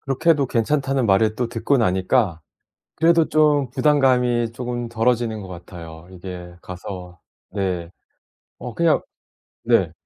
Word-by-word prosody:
그렇게 135 Hz, +5 st, +1 dB
해도 145 Hz, -4 st, +3 dB
괜찮다는 135 Hz, +2 st, 0 dB
말을 110 Hz, +2 st, +3 dB
또 120 Hz, -2 st, -1 dB
듣고 120 Hz, +4 st, +1 dB
나니까 95 Hz, -3 st, +1 dB, 0.6 s
그래도 165 Hz, 0 st, +3 dB
좀 150 Hz, -4 st, +3 dB
부담감이 125 Hz, -4 st, +2 dB
쪼금 120 Hz, 0 st, -4 dB
덜어지는 115 Hz, -1 st, 0 dB
것 95 Hz, -, -8 dB
같아요. 85 Hz, -2 st, -10 dB
이게 90 Hz, -1 st, -9 dB
가서 90 Hz, -1 st, -8 dB, 0.3 s
네. 90 Hz, -4 st, -2 dB, 0.7 s
어 125 Hz, -, -7 dB
그냥 165 Hz, +1 st, +2 dB, 0.6 s
네. -, -, +3 dB
115 Hz, 260 characters per minute, -22 LUFS, 95-135 Hz, 0.7 s, 해도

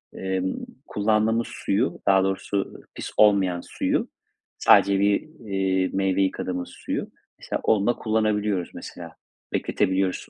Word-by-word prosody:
ımm, 95 Hz, 0 st, -2 dB, 0.2 s
kullandığımız 110 Hz, +2 st, +1 dB
suyu, 110 Hz, +7 st, -1 dB
daha 95 Hz, -1 st, +5 dB
doğrusu 95 Hz, +1 st, -2 dB
pis -, -, -6 dB
olmayan 95 Hz, -4 st, +4 dB
suyu, -, -, -1 dB, 0.5 s
sadece 100 Hz, 0 st, +5 dB
bir, 100 Hz, 0 st, +3 dB, 0.2 s
iii, 95 Hz, -2 st, 0 dB
meyve 95 Hz, 0 st, +1 dB
yıkadığımız 90 Hz, -2 st, -2 dB
suyu, -, -, -4 dB, 0.3 s
mesela, -, -, -3 dB
onunla 110 Hz, +3 st, +3 dB
kullanabiliyoruz, 105 Hz, -4 st, 0 dB
mesela, 85 Hz, -2 st, -9 dB, 0.4 s
bekletebiliyoruz 95 Hz, 0 st, +1 dB
95 Hz, 110 wpm, -24 LUFS, 95-105 Hz, 0.5 s, daha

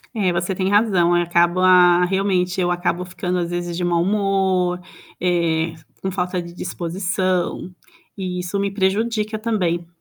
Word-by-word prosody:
É, 195 Hz, -5 st, +1 dB
você 175 Hz, +2 st, -1 dB
tem 185 Hz, +1 st, 0 dB
razão, 195 Hz, -5 st, +3 dB
acaba 175 Hz, +1 st, +4 dB
realmente 185 Hz, -1 st, 0 dB
eu 175 Hz, 0 st, +1 dB
acabo 175 Hz, 0 st, -1 dB
ficando 180 Hz, 0 st, -3 dB
às 170 Hz, -1 st, -2 dB
vezes 175 Hz, 0 st, -3 dB
de 175 Hz, -, -3 dB
mau 175 Hz, -1 st, +1 dB
humor, 190 Hz, -2 st, +1 dB, 0.4 s
eh, 170 Hz, -2 st, +1 dB, 0.3 s
com 190 Hz, -, -2 dB
falta 180 Hz, -1 st, -2 dB
de 170 Hz, 0 st, -10 dB
disposição, 180 Hz, +1 st, -2 dB, 0.4 s
e 180 Hz, -2 st, -3 dB
isso 180 Hz, +3 st, -3 dB
me 200 Hz, 0 st, -1 dB
prejudica 215 Hz, +2 st, 0 dB
também. 180 Hz, -7 st, -1 dB
180 Hz, 145 wpm, -21 LUFS, 175-195 Hz, 0.4 s, acaba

